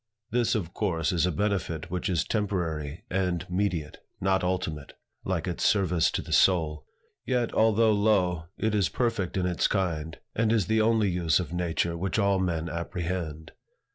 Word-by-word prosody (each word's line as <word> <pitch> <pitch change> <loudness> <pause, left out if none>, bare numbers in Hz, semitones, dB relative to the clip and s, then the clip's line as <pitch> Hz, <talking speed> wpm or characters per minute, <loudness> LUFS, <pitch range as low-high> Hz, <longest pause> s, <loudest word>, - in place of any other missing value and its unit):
This, 120 0 +2
of 90 -6 -3
course, 85 -7 0
is 90 -1 +2
a - - +1
benefit 85 -3 -2
which 90 +2 -2
is 85 -5 +1
temporary 85 -8 -2
and 90 -3 -1
mediate, 90 -5 -1 0.2
not 95 0 +1
ultimate, 90 -5 -2 0.3
like 95 -2 -1
its 90 - -3
service 90 -5 +3
to - - -3
the - - -5
soul. 80 -5 +3 0.4
Yet 125 -2 0
although 110 0 +4
low, 100 -6 +2
it 110 0 0
is 100 -4 +2
perfect 105 -7 -1
in 90 - +1
its 90 -2 +1
kind, 80 -5 -2 0.2
and 115 0 +1
is 110 -5 +2
the 110 0 +2
only 110 -3 +3
use 85 -3 +2
of 90 -2 -4
nature 85 -1 -1
which 95 +5 -2
all 100 -2 +3
men 85 -3 -1
apprehend. 85 -1 -4
90 Hz, 170 wpm, -27 LUFS, 85-100 Hz, 0.4 s, although